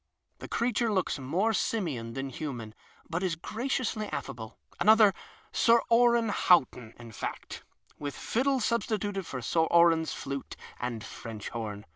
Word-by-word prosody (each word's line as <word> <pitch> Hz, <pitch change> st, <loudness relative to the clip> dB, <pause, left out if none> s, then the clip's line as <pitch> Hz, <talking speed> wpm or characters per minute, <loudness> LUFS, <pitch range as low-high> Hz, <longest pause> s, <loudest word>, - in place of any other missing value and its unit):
The -, -, -8 dB
creature 235 Hz, -1 st, 0 dB
looks 185 Hz, -7 st, 0 dB
more 180 Hz, +12 st, 0 dB
simian 150 Hz, -, -2 dB
than 135 Hz, +1 st, -4 dB
human, 120 Hz, -7 st, -6 dB, 0.3 s
but 165 Hz, +1 st, -2 dB
is 185 Hz, -4 st, 0 dB
graciously 220 Hz, +3 st, -2 dB
affable 110 Hz, -, -6 dB
— -, -, -28 dB
another 215 Hz, -2 st, +6 dB, 0.4 s
Sir 235 Hz, 0 st, +5 dB
Oran 235 Hz, -1 st, +5 dB
Haut 180 Hz, -7 st, +4 dB
ton, 115 Hz, -2 st, -12 dB
in 120 Hz, -1 st, -11 dB
fact, -, -, -6 dB, 0.4 s
with 145 Hz, -1 st, -4 dB
fiddle 265 Hz, +3 st, 0 dB
substituted 210 Hz, -4 st, -1 dB
for 130 Hz, -2 st, -5 dB
Sir 160 Hz, +6 st, +2 dB
Oran's 170 Hz, -1 st, +4 dB
flute 140 Hz, 0 st, -5 dB, 0.2 s
and 120 Hz, -3 st, -4 dB
French 110 Hz, -3 st, -7 dB
horn. 105 Hz, -3 st, -5 dB
170 Hz, 145 wpm, -29 LUFS, -, 0.4 s, another